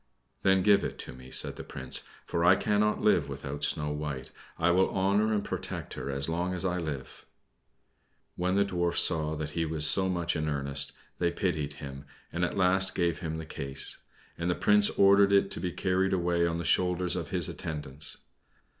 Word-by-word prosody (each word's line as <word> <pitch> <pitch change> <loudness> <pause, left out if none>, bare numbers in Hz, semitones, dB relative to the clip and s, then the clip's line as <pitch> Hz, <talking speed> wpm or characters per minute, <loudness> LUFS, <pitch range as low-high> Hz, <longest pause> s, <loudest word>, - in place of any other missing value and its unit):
"Then 95 -1 +3
give 100 0 +5
it - - -4
to - - -9
me," 65 0 -12
said - - 0
the - - -6
Prince; 65 -1 -3 0.2
"for 85 - -1
I 90 +2 +7
cannot 105 +1 +1
live 105 - +3
without 70 +1 -6
Snow 75 0 +1
White. 75 -3 -5 0.3
I 85 +1 +3
will 95 +2 +3
honor 100 +3 +1
and 105 -2 0
protect - - -5
her - - -5
as 70 0 -2
long 90 +3 -1
as 90 - -1
I 90 -1 0
live." 75 -5 -6 1.1
When 90 +1 0
the 100 0 +3
Dwarfs 85 -3 +2
saw 80 -2 +1
that 75 0 -4
he 85 +1 -1
was 80 -1 0
so 95 +4 +3
much 85 -2 -1
in 75 -1 -1
earnest, 70 -1 +1 0.3
they 85 - +2
pitied 80 -5 -2
him, 70 0 -9 0.3
and - - -1
at - - -1
last 95 0 +2
gave 85 -3 0
him 80 -2 -4
the 80 - -6
case, 70 -3 -2 0.4
and 85 +1 -1
the 90 - +1
Prince 105 0 +4
ordered 100 0 +5
it 100 0 +3
to - - -5
be 90 - -2
carried 95 +2 0
away 85 -1 +1
on 85 0 -2
the 85 - -3
shoulders 90 -1 +2
of - - -4
his - - 0
attendants. 75 -2 -4
85 Hz, 200 wpm, -29 LUFS, 75-95 Hz, 1.1 s, I